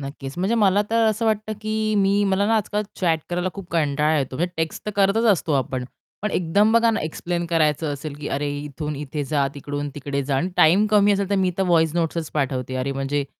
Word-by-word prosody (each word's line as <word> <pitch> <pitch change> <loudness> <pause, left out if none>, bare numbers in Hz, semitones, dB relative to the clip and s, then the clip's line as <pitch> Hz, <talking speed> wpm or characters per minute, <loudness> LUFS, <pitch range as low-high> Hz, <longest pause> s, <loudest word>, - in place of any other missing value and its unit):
नक्कीच. 135 -1 -7
म्हणजे 195 +6 +1
मला 205 -2 +3
तर 230 0 +3
असं 220 +1 -1
वाटतं, 215 0 0
की 215 0 -1
मी 200 +1 +3
मला 195 +1 +1
ना 225 - +2
आजकाल 210 0 -1 0.2
चॅट 165 -4 +2
करायला 180 +1 -1
खूप 195 -3 -9
कंटाळा 150 -1 +2
येतो, 130 -1 -3
म्हणजे 175 +3 -1
टेक्स्ट 160 0 -3
तर 210 - 0
करतच 200 +4 +3
असतो 165 -3 -1
आपण. 130 -2 -1 0.4
पण 210 - -1
एकदम 200 +6 +2
बघा 230 0 +4
ना 220 - -1
एक्सप्लेन 170 +2 -3
करायचं 155 -2 +1
असेल, 145 +1 -6
की 150 - -4
अरे 145 +1 -2
इथून 150 +1 -5
इथे 145 0 -4
जा, 140 -1 +1
तिकडून 145 +1 -4
तिकडे 140 -1 -3
जा 140 -1 0
आणि 175 +7 0
टाईम 185 +7 +5
कमी 205 -1 +5
असेल 200 0 -1
तर - - +2
मी 190 -1 +2
तर 195 - +3
व्हॉईस 165 -3 +2
नोटसचं 165 -2 -1
पाठवते 130 -3 -1
अरे 135 +2 -2
म्हणजे 135 +1 -1
165 Hz, 220 wpm, -22 LUFS, 145-200 Hz, 0.4 s, टाईम